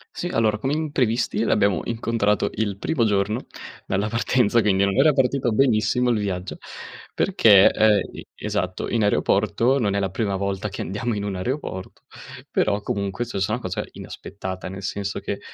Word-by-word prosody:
Sì, 175 - -3
allora 110 -9 +1
come 135 +4 -1
imprevisti 125 -8 0
l'abbiamo 100 -4 +2
incontrato 115 -3 0
il 100 -2 -2
primo 130 +4 0
giorno 105 +2 0 0.4
dalla 100 +3 0
partenza, 115 0 +2
quindi 100 -2 +2
non 100 - 0
era 150 +3 +5
partito 135 -2 +1
benissimo 120 +1 +2
il 115 - +1
viaggio. 95 -2 -4 0.6
Perché, 110 - +6
ehm, 110 -1 +4 0.2
e - - -10
esatto, 100 -3 -3
in 115 - 0
aeroporto, 110 +5 +2
non 100 -5 0
è - - +1
la 95 -2 -1
prima 100 0 -1
volta 100 +1 -2
che 100 - -6
andiamo 105 +6 -2
in 100 - -3
un 100 -1 -3
aeroporto, 95 -2 -5 0.5
però 105 -1 +1
comunque 100 -1 -2
è - - -8
successa 100 +2 -1
una 125 - -2
cosa 95 -4 -3
inaspettata. 95 -2 -7
Nel 95 +1 -8
senso 100 +1 -3
che - - -4
105 Hz, 170 wpm, -23 LUFS, 100-120 Hz, 0.6 s, Perché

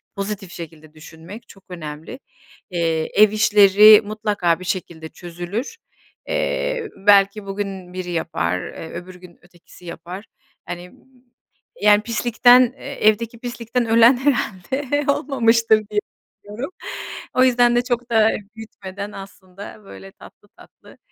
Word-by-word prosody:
pozitif 195 -2 -5
şekilde 155 -2 -11
düşünmek 165 +8 -12
çok 195 - -17
önemli. 160 - -8 0.5
Eee, 165 -2 -1
ev 215 -1 +7
işleri 210 0 +7
mutlaka 205 -5 -1
bir 185 - -9
şekilde 170 -3 -5
çözülür. 175 - -6 0.5
Eee, - - -2
belki 200 +1 +3
bugün 195 -2 -6
biri 185 -1 -5
yapar 90 - -2
eee 160 - -9
öbür 180 +2 -9
gün 180 -1 -16
ötekisi 175 0 -19
yapar. 180 +4 -9 0.4
Hani, 175 +1 -8 0.9
yani, 210 0 +5
pislikten, 245 +2 +4
eee, 275 -6 -3
evdeki 230 +2 +1
pislikten 240 0 -3
ölen 230 +3 +5
herhâlde 265 +2 -1
olmamıştır 230 -5 +2
diye 210 -1 0 0.4
düşünüyorum. 235 - -7 0.6
O 255 - +5
yüzden 245 -1 +3
de 240 - +2
çok 240 -1 -3
da 220 -1 +4 0.3
büyütmeden 200 -2 -9
aslında 195 +2 -11
böyle 95 - -12
tatlı - - -18
tatlı, - - -18
205 Hz, 120 wpm, -20 LUFS, 180-235 Hz, 0.9 s, ev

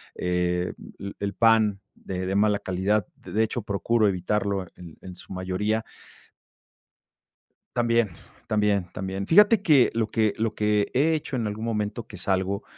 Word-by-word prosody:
eh, 90 0 -1
l - - -13
l 100 0 -6
el 100 0 -2
pan 110 -2 +3
de 95 -1 -5
de 95 - -1
mala 105 0 +3
calidad, 95 +2 0
de 110 +2 -1
hecho, 110 +1 -2
procuro 110 +2 +1
evitarlo 100 +1 -1
en 85 -3 -12
en 90 -1 -9
su 90 - -10
mayoría. 95 +4 -1 1.9
También, 120 -2 +2 0.4
también, 105 -3 +1
también. 95 +1 -4
Fíjate 210 +4 +6
que 145 -9 +5
lo 115 -1 0
que 110 -1 +1
lo 110 0 -1
que 105 -1 +1
he 150 +6 +3
hecho 150 -3 -3
en 120 -3 -1
algún 105 +2 -4
momento, 110 0 -3
que - - -11
salgo, 95 +2 -1
105 Hz, 155 wpm, -25 LUFS, 95-115 Hz, 1.9 s, Fíjate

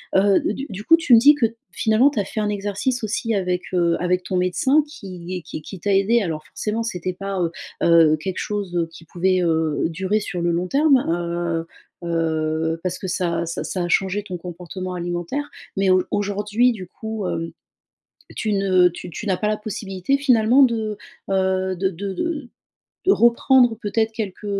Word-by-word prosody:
heu, 195 +1 +5
d 265 +7 -2
du 200 0 -7
coup, 330 +8 +6
tu 315 -6 +2
me 230 - +9
dis 290 +5 +7
que, 260 - +2 0.3
finalement, 220 +5 +3
tu 275 - -3
as 200 - 0
fait 215 - -5
un 210 - 0
exercice 205 +5 -2
aussi 225 +2 -1
avec, 180 -2 0
heu, 170 -2 +2
avec 180 0 +1
ton 185 - -3
médecin 185 - +2
qui 185 - -7
est - - -7
qui 155 - -7
qui 185 +4 -9
t'a 200 +3 0
aidée, 215 +5 +3
alors 160 -5 -3
forcément, 220 +2 -3
c'était 185 -5 -3
pas, 195 +1 -4
heu 170 -2 0 0.3
heu 165 -2 +5
quelque 185 +4 -5
chose, 200 -4 -3
heu 170 -1 +1
qui 165 0 -14
pouvait, 185 +2 +1
heu, 160 -3 +1
durer 190 +5 0
sur 180 -4 -4
le 170 0 +1
long 175 +2 -1
terme, 285 +2 +4
heu 170 -1 -1 0.4
heu, 160 -1 -1
parce 185 -1 -2
que 190 - -6
ça 170 -2 -1
ça 165 - -4
ça 185 - -3
a 175 - -1
changé 195 +3 +1
ton 185 -3 -6
comportement 180 +1 -7
alimentaire 175 - -3 0.3
mais 195 0 +2
auj 185 0 +4
aujourd'hui, 205 +4 +1
du 185 -5 -8
coup, 220 -1 -5
hem, 165 -1 -3 0.8
tu 215 - -1
ne 185 -2 +4
tu 175 +1 -9
tu 175 - -7
n'as 185 -2 +1
pas 210 - -1
la 215 0 0
possibilité, 210 +3 -2
finalement 250 -1 +4
de, 220 -4 0 0.3
heu, 190 0 +1
de 190 +2 0
de 195 +2 -5
de 290 - -3 0.6
de 390 - +6
reprendre 240 0 +4
peut-être 220 +1 0
quelque, 210 -2 -5
190 Hz, 195 wpm, -22 LUFS, 175-220 Hz, 0.8 s, me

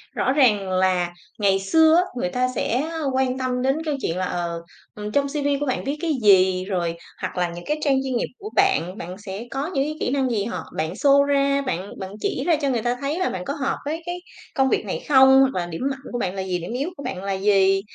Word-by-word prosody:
Rõ 260 - +1
ràng 215 -9 +3
là 185 -1 +1 0.3
ngày 195 -2 +3
xưa 315 +12 +4
á, 355 - +5
người 270 +2 -1
ta 255 -1 0
sẽ, 245 +2 0
a, 325 - -4
quan 260 -1 +1
tâm 255 -1 -1
đến 265 +2 +2
câu 300 -2 0
chuyện 165 - -2
là, 185 - 0
ờ, 170 -2 -3 0.3
ừm, 210 0 -5
trong 280 +4 +2
CV 285 -1 -1
của 290 - -1
bạn 255 - -1
viết 285 +2 -2
cái 335 - 0
gì 185 -2 +5
rồi 175 -4 -2 0.2
hoặc - - -4
là 180 -1 +1
những 175 0 -8
cái 300 - 0
trang 280 -3 +3
chuyên 260 -2 -2
nghiệp - - -1
của 420 - -7
bạn. 385 - +2
Bạn 180 0 -7
sẽ 200 +1 -7
có 270 +1 -2
những 270 - +2
cái 305 +2 -3
kỹ - - -1
năng 270 -2 +1
gì 210 -4 0
họ 185 -7 -4
bạn 160 +1 -1
show 280 +5 +4
ra, 280 0 +2
bạn 200 -8 -3
bạn 190 0 -6
chỉ 265 - -1
ra 340 - +5
cho 280 - +1
người 240 -4 0
ta 240 +2 0
thấy 290 +5 -2
là 370 - +1
bạn 180 -1 -5
có 280 - -2
hợp 280 -3 -2
với 315 +3 -3
cái 350 0 -3 0.4
công 265 0 +3
việc - - 0
này - - -4
không, 265 -1 +7
hoặc 265 0 +3
là - - -3
điểm 165 -1 -6
mạnh 270 - -6
của 245 - -3
bạn 185 -3 -2
là 190 - -2
gì, 185 -1 -2
điểm 175 +5 -6
yếu 275 +7 -2
của 280 - -8
bạn 195 -8 -5
là 195 0 -1
gì, 195 0 +3
250 Hz, 265 wpm, -23 LUFS, 190-280 Hz, 0.4 s, không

